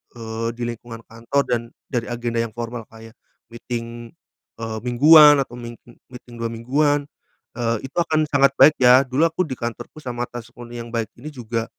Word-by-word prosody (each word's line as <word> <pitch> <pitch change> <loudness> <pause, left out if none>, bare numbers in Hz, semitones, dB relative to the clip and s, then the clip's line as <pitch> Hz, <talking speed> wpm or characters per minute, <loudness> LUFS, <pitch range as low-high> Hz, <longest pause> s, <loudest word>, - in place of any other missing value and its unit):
eee, 115 0 -4
di 120 - -4
lingkungan 115 0 -8
kantor 115 +5 -1
dan 120 -1 +1 0.3
dari 120 -2 -2
agenda 120 -1 -3
yang 115 -2 -7
formal 115 0 -6
kayak 115 0 -14 0.4
meeting, 115 0 -7 0.5
eee, 110 -1 -4
mingguan 145 +3 +7
atau 125 -2 -6
ming 120 -1 -8
eee, 120 - -17 0.2
meeting 125 -1 -12
2 115 0 -2
mingguan, 145 +5 0 0.5
eee, 115 -1 0
itu - - -18
akan 155 -2 +2
sangat 140 -2 +4
baik 155 - +8
ya. 125 0 +7
Dulu 130 +5 +1
aku 165 +2 -2
di 130 - -4
kantorku 120 +5 -6
sama 120 -1 -3
atasku 120 +1 -10
nih 120 -1 -7
yang - - -11
baik 115 -1 -2
ini 150 +5 -7
juga 115 -3 -3
120 Hz, 185 wpm, -22 LUFS, 115-135 Hz, 0.5 s, baik